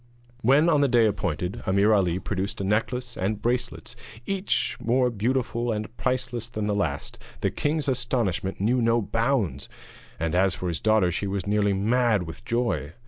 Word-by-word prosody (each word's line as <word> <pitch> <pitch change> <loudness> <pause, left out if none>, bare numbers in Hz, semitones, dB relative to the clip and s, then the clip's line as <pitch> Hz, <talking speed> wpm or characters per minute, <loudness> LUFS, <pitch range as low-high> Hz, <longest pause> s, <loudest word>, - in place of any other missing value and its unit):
When, 140 +7 +4
on 150 -4 +4
the 140 - +4
day 120 -3 +4
appointed, 90 -4 -2
Ameer 100 +3 +4
Ali 90 -4 +2
produced 95 +1 -3
a - - -2
necklace 120 +5 -1
and 100 +3 -1
bracelets 120 +1 -2 0.3
each 195 0 0
more 125 +2 +2
beautiful 120 +1 -1
and 110 +1 -4
priceless 125 -3 -2
than 110 -3 -3
the 105 - 0
last, 80 -9 -2 0.2
the - - +1
king's 150 0 -1
astonishment 120 -8 -1
knew 120 +5 +2
no 115 0 +3
bounds, 110 - -1 0.5
and 80 0 -1
as 95 0 +3
for 90 - -3
his 80 - -3
daughter 110 -5 +3
she 100 +4 -2
was 95 -2 -2
nearly 105 0 +2
mad 110 0 +2
with 80 -1 -9
joy. 115 -10 -1
110 Hz, 170 wpm, -25 LUFS, 95-125 Hz, 0.5 s, When